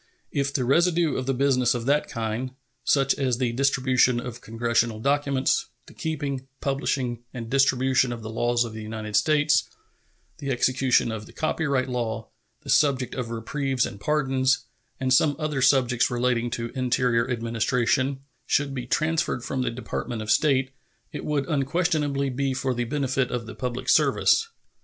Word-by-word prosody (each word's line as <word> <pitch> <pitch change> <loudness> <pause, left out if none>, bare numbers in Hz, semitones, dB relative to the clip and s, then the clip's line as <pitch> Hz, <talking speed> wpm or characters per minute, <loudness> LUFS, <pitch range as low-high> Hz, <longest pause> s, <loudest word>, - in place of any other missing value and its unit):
If 140 -1 0
the 135 -3 -1
residue 170 +3 +3
of 130 - -3
the 135 - +2
business 125 -2 +2
of 120 -1 -4
that 145 +3 +1
kind 115 +3 -3 0.3
such 135 -1 +3
as 130 -4 +1
the 125 -2 0
distribution 130 -1 +2
of 125 0 -7
Congressional 115 0 0
documents, 140 +1 +1 0.2
the - - -15
keeping, 140 -4 -4
publishing, 135 -3 -2
and 115 -2 -6
distribution 130 -1 +3
of 115 -2 -6
the 110 - -6
laws 120 +1 +1
of 115 - -7
the 110 - -7
United 110 -1 -5
States, 150 -1 +3 0.7
the 140 - -4
execution 130 -1 +2
of 110 -1 -6
the - - -13
copyright 140 -5 0
law, 115 -3 -3 0.3
the - - -11
subject 135 -4 +2
of 125 -3 -4
reprieves 130 +3 -1
and 100 - -8
pardons, 135 -1 +1 0.3
and 130 -1 +1
some 145 +2 +4
other 155 -3 -2
subjects 125 -3 +3
relating 120 -1 0
to 115 0 -4
interior 125 -2 +1
administration 125 +3 0 0.3
should 140 -1 +1
be 125 -2 -5
transferred 155 -4 0
from 135 -1 -2
the 125 - 0
Department 115 -1 -4
of 110 - -1
State, 135 -2 +2 0.4
it - - -6
would 145 -2 -1
unquestionably 145 -2 0
be 135 +1 -1
for 130 0 -1
the 120 0 -2
benefit 135 -1 0
of 120 -2 -3
the 110 - -8
public 125 -1 -4
service. 450 - +3
130 Hz, 160 wpm, -25 LUFS, 120-140 Hz, 0.7 s, some